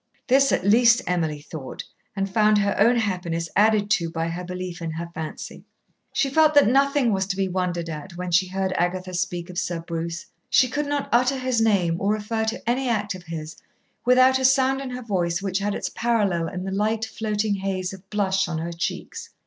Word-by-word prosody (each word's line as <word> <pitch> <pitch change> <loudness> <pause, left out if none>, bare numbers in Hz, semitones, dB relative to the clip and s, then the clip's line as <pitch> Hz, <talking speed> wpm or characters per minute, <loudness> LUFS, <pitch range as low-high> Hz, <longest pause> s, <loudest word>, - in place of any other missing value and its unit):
This, 275 +2 +5
at - - 0
least, 235 +3 +5
Emily 160 -4 -1
thought, 150 -3 -8 0.3
and 195 -1 -1
found 210 +1 +3
her 200 -1 +1
own 235 +4 +5
happiness 180 -6 -2
added 210 0 +3
to 170 -6 +2
by 165 0 -2
her 175 +2 -5
belief 180 -1 -6
in 165 - -3
her 170 +2 -5
fancy. 160 -2 -7 0.5
She 295 - +1
felt 305 +2 +3
that 285 - +7
nothing 275 -1 +3
was 190 -1 0
to 195 - -2
be 195 0 0
wondered 180 -2 -2
at 165 +3 -7
when 180 0 -4
she 180 +2 +3
heard 190 0 -2
Agatha 185 +1 -1
speak 175 -1 -2
of 175 - -3
Sir 175 -1 -2
Bruce. 165 +1 -5 0.2
She 255 - +5
could 295 +3 -2
not 285 -1 -1
utter 255 +3 +3
his 255 -3 0
name 185 -7 +2
or 200 +2 +2
refer 220 +1 -2
to 225 +1 -4
any 255 +2 +1
act 210 -2 0
of 185 - -9
his 155 -2 -6 0.5
without 255 +1 +5
a 260 - +1
sound 265 +1 +3
in 270 - -5
her 250 0 -6
voice 175 -6 -1
which 195 -1 -2
had 205 0 -1
its - - -3
parallel 205 -8 +1
in 185 +2 -5
the 190 - -4
light 215 +3 0
floating 215 -1 -2
haze 190 -1 -3
of 190 0 -13
blush 195 -2 +1
on 170 -2 -3
her 170 +2 -4
cheeks. 180 - -5
195 Hz, 210 wpm, -24 LUFS, 175-230 Hz, 0.5 s, that